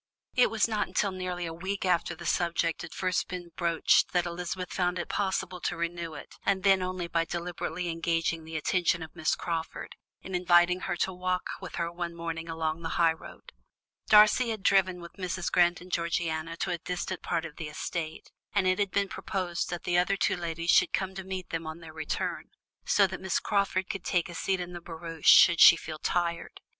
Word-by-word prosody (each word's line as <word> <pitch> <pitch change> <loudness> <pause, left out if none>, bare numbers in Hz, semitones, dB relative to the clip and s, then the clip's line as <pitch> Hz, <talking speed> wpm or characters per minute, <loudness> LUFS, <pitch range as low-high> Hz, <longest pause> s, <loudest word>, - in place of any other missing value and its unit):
It 250 - +4
was 225 -1 +2
not 215 -2 -1
until 200 - 0
nearly 180 -1 -4
a 165 - -5
week 190 +4 -3
after 175 -1 +1
the 175 +1 -10
subject 170 -1 0
had 175 - -8
first 185 -1 0
been 175 -2 -7
broached 170 -2 +3
that 180 -1 +2
Elizabeth 180 +1 -4
found 180 -1 0
it 175 - -4
possible 190 -2 -2
to - - -2
renew 170 -1 -3
it, - - -11
and 195 -1 +1
then 195 -2 +5
only 185 -1 -3
by 165 -1 +1
deliberately 175 0 -4
engaging 165 -1 -1
the 160 0 -5
attention 170 +1 +1
of 160 - -11
Miss 160 -2 +1
Crawford, 165 -2 -4 0.3
in 190 - -8
inviting 175 0 +4
her - - 0
to 190 - 0
walk 180 0 -1 0.2
with - - -7
her 170 0 -2
one 170 0 -5
morning 165 0 -5
along 160 0 -2
the 165 - -3
high 165 -1 +4
road. 160 - -13 0.6
Darcy 215 +3 +6
had 220 -3 -4
driven 185 -2 +3
with 170 - -10
Mrs. 185 -1 -2
Grant 175 -1 +3
and 180 +1 -12
Georgiana 165 -1 -1
to - - -2
a 170 - -2
distant 180 +2 -4
part 165 -2 -1
of 150 - -9
the 160 - -5
estate, 155 +1 -5 0.2
and 200 -2 +3
it 185 +1 +2
had 200 -1 +1
been 200 +1 +1
proposed 180 -2 -3
that 175 -1 -4
the 175 -1 +2
other 195 +2 +1
two - - +1
ladies 170 -1 -1
should - - +4
come 190 0 -1
to 190 0 -6
meet 190 -1 -5
them 165 -1 -3
on 160 +1 -5
their 160 -2 -11
return, 155 -1 -3 0.4
so 200 - +5
that 190 0 -5
Miss 190 -2 0
Crawford 195 -2 0
could 195 -3 -5
take 175 -1 0
a - - -7
seat 190 +2 -1
in 180 0 -5
the 175 - -7
barouche 165 -1 -2
should 170 -2 +8
she - - +10
feel 155 -2 -7
tired. 170 0 -2
175 Hz, 210 wpm, -29 LUFS, 165-185 Hz, 0.6 s, she